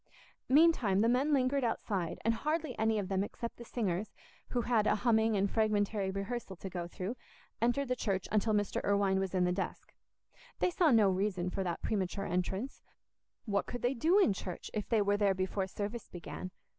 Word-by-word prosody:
Meantime 260 - +5
the 225 - +4
men 255 +5 +2
lingered 270 0 +2
outside, 195 -7 -1
and 230 - +4
hardly 305 +2 -2
any 220 0 +2
of 200 -3 -2
them 195 0 0
except 230 +3 -6
the 235 - -9
singers, 210 -4 -2 0.3
who 245 - 0
had 225 -3 +2
a - - +4
humming 220 -1 +2
and 195 0 +1
fragmentary 210 -2 +1
rehearsal 195 +1 -4
to 190 +1 -8
go 175 -1 -4
through, 185 +6 -5 0.5
entered 245 +4 +2
the 250 - 0
church 195 -6 -1
until 215 +1 +2
Mr. 205 -2 0
Irwine 200 -1 +2
was 190 -1 -2
in 180 -1 +3
the 180 - +1
desk. 190 +2 -4 0.6
They 360 - +1
saw 345 -2 +3
no 225 -6 +5
reason 185 -2 -1
for 195 - -2
that 175 -2 -3
premature 195 -1 -1
entrance—what 200 +2 -4
could 245 - -6
they 245 +2 +2
do 320 - +3
in 385 - +5
church 185 -2 -6
if 210 -1 -3
they 220 -3 +3
were 205 0 +2
there 200 -2 +2
before 190 +1 -1
service 205 +4 -5
began? 180 +1 -7
210 Hz, 190 wpm, -32 LUFS, 190-240 Hz, 0.6 s, Meantime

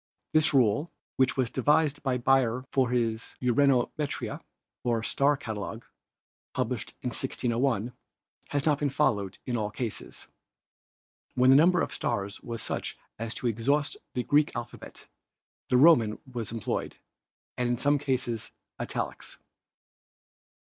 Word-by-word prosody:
This 155 0 +5
rule, 130 +3 +2 0.3
which 130 0 +2
was 125 -3 +1
devised 145 +2 +2
by 130 -2 0
Beyer 130 -1 +2
for 130 -3 +2
his 115 -2 -1
Uranometria, 135 +3 +1 0.4
or 115 -2 0
star 140 +4 +2
catalogue, 110 -8 -6 0.7
published - - -2
in - - 0
1601, 120 -1 -1 0.6
has 145 -1 0
not 150 -2 +3
been 145 - +1
followed 100 -7 0
in 125 - -2
all 105 -2 -1
cases. 110 0 -5 1.1
When 130 +1 +5
the - - +8
number 175 +4 +5
of - - -4
stars 100 0 -2
was 115 -1 -5
such - - -4 0.2
as 115 0 -3
to - - -5
exhaust 135 +6 +1 0.2
the 125 - 0
Greek 145 +3 +2
alphabet 120 - -8 0.6
the 125 - +4
Roman 125 -7 +6 0.2
was 115 -4 -3
employed 115 -3 -3 0.6
and 125 -1 0
in 120 - +1
some 145 +3 +2
cases 130 -5 -2 0.3
italics. - - -4
125 Hz, 130 wpm, -28 LUFS, 115-140 Hz, 1.1 s, the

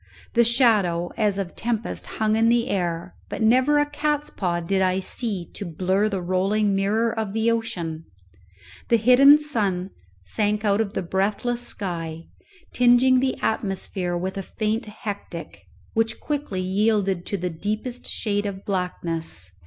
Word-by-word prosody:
The 235 - +5
shadow 215 -8 +3
as 210 -3 +1
of 190 -3 -4
tempest 230 -1 -3
hung 215 0 +2
in 225 +1 +3
the 240 +1 +2
air, 175 -1 -2
but - - -3
never 260 +6 +4
a 290 - +4
cats 295 0 -1
paw 175 -3 -1
did 190 +3 0
I 185 0 +2
see 190 -1 -3
to - - -6
blurr 190 +4 0
the 195 -3 -3
rolling 195 +3 +1
mirror 215 +4 +1
of 220 -3 -3
the 225 +1 +2
ocean. 170 -8 -3 0.8
The 235 - +5
hidden 255 +6 +7
sun 200 -11 -1 0.3
sank 210 - 0
out 205 +1 +3
of 205 -2 -3
the - - -2
breathless 205 +7 -1
sky, 165 -8 -3 0.5
tingeing 250 +1 +5
the 260 0 0
atmosphere 190 -4 -1
with 190 +2 -3
a - - -2
faint 215 +3 -2
hectic, 200 - -7 0.3
which 225 0 0
quickly 285 -11 -3
yielded 195 -1 +1
to 200 - -1
the 180 -1 -3
deepest 215 +8 -4
shade 205 -1 -1
of 195 -1 -6
blackness. 165 - -2
205 Hz, 155 wpm, -24 LUFS, 185-230 Hz, 0.8 s, hidden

